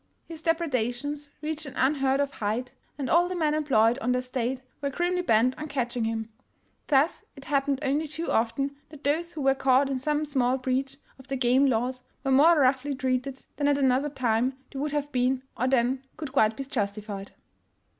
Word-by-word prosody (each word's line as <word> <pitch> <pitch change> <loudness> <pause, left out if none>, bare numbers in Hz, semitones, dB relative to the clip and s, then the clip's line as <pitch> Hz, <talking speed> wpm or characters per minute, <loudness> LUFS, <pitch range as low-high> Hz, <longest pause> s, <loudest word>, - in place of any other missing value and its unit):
His 325 -2 -9
depredations 290 -3 -1
reached 310 0 -3
an 270 - -9
unheard 270 0 +2
of 285 0 0
height, 230 +2 -3 0.3
and 275 -3 -3
all 345 +5 +4
the 365 - -3
men 310 -3 +1
employed 265 -6 +3
on 250 0 0
the - - +1
estate 255 0 -2 0.2
were 280 - 0
grimly 355 +5 0
bent 250 -5 +3
on 305 - -4
catch 255 -4 -2
ing 235 -2 0
him. 225 0 -2 0.6
Thus 290 +3 +2
it 275 -1 -12
happened 280 -1 +1
only 290 +3 0
too 325 +3 -4
often 275 +5 0
that 300 -1 -13
those 325 +4 0
who 310 - -5
were 270 0 +4
caught 270 +1 +3
in 265 - -1
some 300 +3 0
small 260 -3 +1
breach 260 +1 -2 0.2
of 265 - -15
the 270 - -2
game 255 +2 +4
laws 255 +1 -1 0.2
were 270 - 0
more 305 +5 +6
roughly 270 +1 +2
treated 260 0 -2
than 285 - +1
at 285 -1 +3
another 270 +1 +2
time 255 -1 0 0.2
they 270 - -5
would 295 +1 -1
have 290 0 -2
been 255 0 +1
or 255 - 0
than 260 0 +1
could 295 -4 -6
quite 220 -5 +3
be 275 - -3
justified. 205 -5 -4
270 Hz, 195 wpm, -27 LUFS, 250-290 Hz, 0.6 s, more